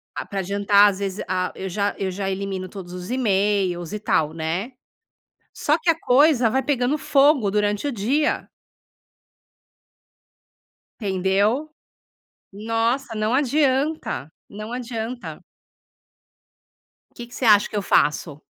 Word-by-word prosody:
ah - - -4
pra 195 - -4
adiantar 200 +2 +4
às 195 0 -5
vezes, 195 0 -3
ah, 185 0 -1
eu 190 - -5
já 200 +2 -1
eu 195 -1 -2
já 195 +1 -3
elimino 190 -1 -4
todos 185 -3 -9
os 180 +4 -7
emails 200 -7 0
e 210 - -3
tal 160 -6 0
né? 165 +10 -3 0.8
Só 300 +2 +1
que 335 +2 -1
a 325 0 +3
coisa 255 -2 +4
vai 265 +4 +1
pegando 265 +1 0
fogo 280 -6 +3
durante 210 +5 0
o - - -1
dia. 255 +8 0 2.5
Entendeu? 200 +8 0 0.8
Nossa, 225 +4 -1
não 215 +2 0
adianta, 280 - 0 0.2
não 215 +3 -8
adianta. 240 0 -5 1.7
O - - -36
que 240 0 -9
você 255 - -5
acha 210 -2 +5
que - - -6
eu 205 - 0
faço? 150 -3 +1
210 Hz, 130 wpm, -22 LUFS, 195-255 Hz, 2.5 s, acha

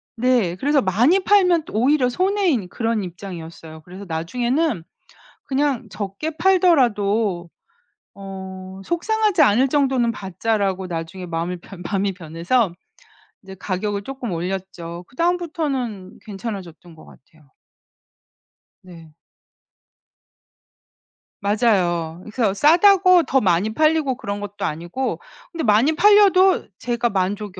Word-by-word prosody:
네. 235 -7 +1
그래서 285 +7 +2
많이 240 - +3
팔면 360 -6 +3
또 - - -12
오히려 255 +4 +2
손해인 360 - 0
그런 225 +1 -2
입장이었어요. 165 -3 -9
그래서 185 +5 -11
나중에는 240 - -1 0.6
'그냥 270 -4 -1
적게 200 +10 -5
팔더라도 230 - +2 0.6
어 190 -1 -9
속상하지 420 +1 +1
않을 260 0 +4
정도는 265 -4 +1
받자.'라고 195 -1 -2
나중에 170 +2 -6
마음을 170 +1 -3
변 180 +1 -12
마음이 195 +2 -1
변해서 175 +5 -1 0.7
이제 190 -1 -11
가격을 200 +2 -3
쪼끔 260 -2 -6
올렸죠. 175 -1 -5
그다음부터는 280 - -3
괜찮아졌던 190 -5 -8
것 - - -15
같아요. 150 0 -21 1.3
네. 165 -4 -14 2.3
맞아요. 180 -6 0
그래서 215 -2 -1
싸다고 360 - +5
더 265 -2 +1
많이 190 +3 +1
팔리고 310 -2 +2
그런 200 -4 -5
것도 205 0 -7
아니고 175 +12 -3 0.3
근데 330 -2 -4
많이 225 +8 +3
팔려도 385 0 +5
제가 240 0 -1
만족이 195 0 -3
210 Hz, 270 characters per minute, -21 LUFS, 185-280 Hz, 2.3 s, 싸다고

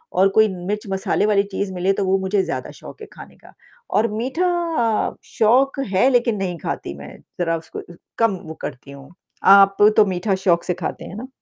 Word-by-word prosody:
और 190 +2 +5
कोई 220 +2 +4
मिर्च-मसाले 195 +2 -2
वाली 205 -2 +3
चीज़ 195 0 -3
मिले 185 +2 0
तो 195 - -2
वो 190 +1 +2
मुझे 190 +1 0
ज़्यादा - - -5
शौक - - -12
है - - -9
खाने - - -13
का - - -19 0.4
और 220 +2 +3
मीठा 260 +11 -2 0.8
शौक 260 +6 +2
है 220 +8 +4
लेकिन 240 -3 +2
नहीं 185 -3 -3
खाती - - -5
मैं, 70 +1 -11 0.2
ज़रा 165 -1 0
उसको 160 0 -9 0.4
कम 230 -4 +2
वो 160 - -6
करती 135 +2 -7
हूँ। 140 +3 -13 0.3
आप 195 0 +7 0.2
तो 215 - +7
मीठा 190 +1 -1
शौक 170 -2 +3
से 180 - -1
खाते 175 -1 -6
हैं - - -9
ना? 240 +5 -7
195 Hz, 190 wpm, -20 LUFS, 180-215 Hz, 0.8 s, आप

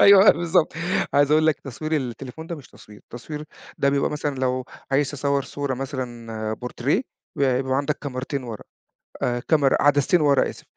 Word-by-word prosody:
أيوه 200 0 +9
بالضبط 170 -2 +2 0.4
عايز 145 0 +4
أقول 155 +1 +4
لك 155 - +2
تصوير 155 +4 -3
التليفون 135 +4 -5
ده 170 - -5
مش 140 - -13
تصوير، 105 0 -15
تصوير 150 +5 -7 0.3
ده 140 - +3
بيبقى 140 0 +1
مثلًا 150 -1 -2
لو 130 -1 -1 0.3
عايز 140 0 +2
تصور 140 -1 0
صورة 140 0 -3
مثلًا 120 -5 -4
بورتريه 125 - -1 0.3
بيبقى 130 -1 +1
عندك 145 +2 -1
كاميرتين 135 0 -4
ورا، 115 -3 -7 0.9
كاميرا 145 -4 +4
عدستين 145 +4 +4
ورا 140 -3 +4
آسف، - - -10
140 Hz, 155 wpm, -24 LUFS, 130-150 Hz, 0.9 s, أيوه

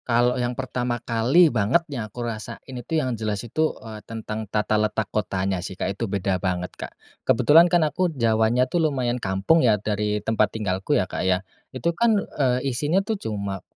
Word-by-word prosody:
Kalau 120 0 +3
yang 120 0 -2
pertama 125 -2 -2
kali 120 +8 +3
banget 120 +10 +2
yang 120 -9 -5
aku 120 +3 -6
rasain 110 -2 -5 0.2
itu, 125 +6 -3
yang 130 -5 0
jelas 110 -1 -3
itu, 155 +7 -1
eee, 110 -1 -8
tentang 110 -1 -6
tata 105 0 0
letak 110 0 -1
kotanya 95 -2 -1
sih, 95 +1 -7
Kak. 95 - -2
Itu 110 +2 -4
beda 95 -2 -1
banget, 90 -1 -2
Kak. - - -7 0.3
Kebetulan 165 +4 +5
kan 175 -3 +3
aku 180 +4 0
Jawanya 115 -3 +2
tuh 170 +6 -1
lumayan 125 -3 -2
kampung 100 - +2
ya, 110 -4 +4
dari 105 0 -1
tempat 110 -1 +1
tinggalku 95 -3 0
ya, - - +1
Kak, - - -5
ya. 95 +1 +1 0.2
Itu 170 +6 -2
kan, 225 +4 +3
eee, 130 -9 -1
isinya 150 +10 +1
tuh 220 - -1
cuma 100 -3 -4
115 Hz, 190 wpm, -24 LUFS, 105-130 Hz, 0.3 s, Kebetulan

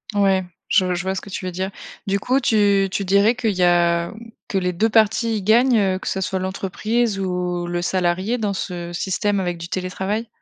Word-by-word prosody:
Ouais, 195 -2 +3 0.2
je 185 -2 +3
je 175 - -2
vois 190 0 -1
ce - - -3
que 200 - -11
tu 185 - -5
veux 185 - -3
dire. 190 +2 -3 0.3
Du 200 0 0
coup 255 +6 +1
tu 205 -5 +3
tu 200 - -1
dirais 200 +5 +3
qu'il 230 -3 0
y 180 - +1
a 170 -1 +2 0.3
que 195 - -1
les 180 0 0
2 220 +6 +1
parties 220 +1 +2
y - - -3
gagnent, 235 +5 +4
heu, 190 -2 +1
que - - -8
ce 190 - -1
soit 190 0 -1
l'entreprise 200 +4 -1
ou 180 -2 -2
le 175 0 -2
salarié 185 +6 0
dans 205 -3 -1
ce 175 -2 -5
système 195 +3 -1
avec 175 -2 -2
du 170 0 -8
télétravail? 190 +4 -3
190 Hz, 215 wpm, -21 LUFS, 180-210 Hz, 0.3 s, gagnent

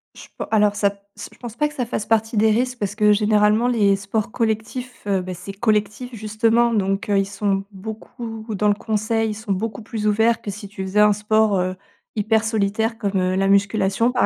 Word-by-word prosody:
Je - - -12
pen - - -3
alors 210 -2 +3
ça 200 -1 +2 0.3
s - - -8
je - - -20
pense 235 -3 -8
pas 300 +5 +1
que - - -14
ça 255 -4 -2
fasse 220 -2 -3
partie 225 0 +1
des 220 +1 +4
risques 250 +2 0
parce 205 -1 -2
que, 210 -1 +4
généralement, 210 +2 +3
les 210 -5 +3
sports 200 +2 -3
collectifs, 230 +3 -3
heu, 195 -2 +1
ben, 185 0 -6
c'est 180 +3 -8
collectif 215 +3 -1
justement 225 +2 +2
donc, 195 -1 0
heu, 200 - +3
ils 195 - +1
sont 195 -1 -1
beaucoup 220 +2 -8
dans 210 +2 +1
le - - +5
conseil, 220 +1 -1
ils - - -3
sont 220 -1 -6
beaucoup 220 +4 -3
plus 215 -1 -3
ouverts 225 +2 +3
que - - -6
si 205 +1 -8
tu 195 0 -8
faisais 190 +2 0
un 210 0 +6
sport, 210 0 +2
heu, 185 +1 -1 0.4
hyper 220 +1 +2
solitaire 220 +1 0
comme, 200 -3 -1
heu, 185 0 0
la 195 +1 +1
musculation 200 +3 +2
par 250 - +2
210 Hz, 220 wpm, -21 LUFS, 200-225 Hz, 0.4 s, un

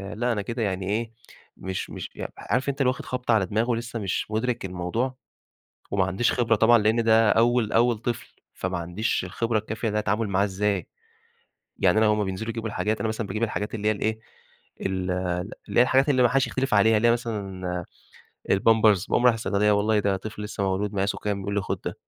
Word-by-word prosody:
لأ 120 +3 0
أنا 105 -3 -1
كده 115 +4 -4
يعني 95 -2 -2
إيه 110 +2 -1 0.5
مش 95 0 -4
مش - - -7
عارف - - -5
عارف 130 +3 -1
أنت 140 0 -2
واخد 130 -1 0
خبطة 125 -2 -1
على 105 -4 +3
دماغه 110 +6 -1
ولسه 120 0 -2
مش 100 +1 -2
مدرك 120 +1 -1
الموضوع، 95 +8 -2 0.8
وماعنديش 95 +4 +1
خبرة 115 -2 +2
طبعًا 115 +2 +5
لأن 110 +2 +2
ده 110 -1 +5
أول 115 0 +3
أول 120 0 +3
طفل، 120 +1 -5 0.2
فما 90 0 -3
عنديش 90 +7 -2
الخبرة 115 -1 -1
الكافية 110 +2 -3
ده 105 0 0
التعامل 105 +2 0
معاه 100 0 +2
إزاي، 100 -1 -1 0.9
يعني 95 +3 +3
أنا 110 - +4
هُم 105 -1 +2
بينزلوا 95 +4 -4
يجيبوا 115 0 -4
الحاجات 110 +1 -1
أنا 110 - 0
مثلًا 110 0 -3
باجيب 110 +2 -4
الحاجات 105 -2 -2
اللي 105 -1 -1
هي - - +4
ايه، 110 0 0 0.6
ال 95 -1 -2 0.6
اللي - - +3
هي - - +9
الحاجات 135 +3 +3
اللي 130 -3 +4
ما 120 - +5
حدش 135 +2 +2
يختلف 135 -2 -1
عليها، 110 +2 +5
اللي 115 +2 +3
هي - - +6
مثلًا 95 -6 -3 0.7
البامبرز 110 -1 +4
باقوم 120 - +1
رايح 125 - +7
الصيدلية 105 -2 +1
والله 105 +1 +2
ده 100 -1 +1
طفل 105 +2 -8
لسه 105 -1 -4
مولود 100 +2 -1
مقاسه 100 0 0
كام؟ 100 -1 -2
يقول 100 +1 -3
لي 100 - +1
خد - - -3
ده - - -2
110 Hz, 200 wpm, -25 LUFS, 100-115 Hz, 0.9 s, هي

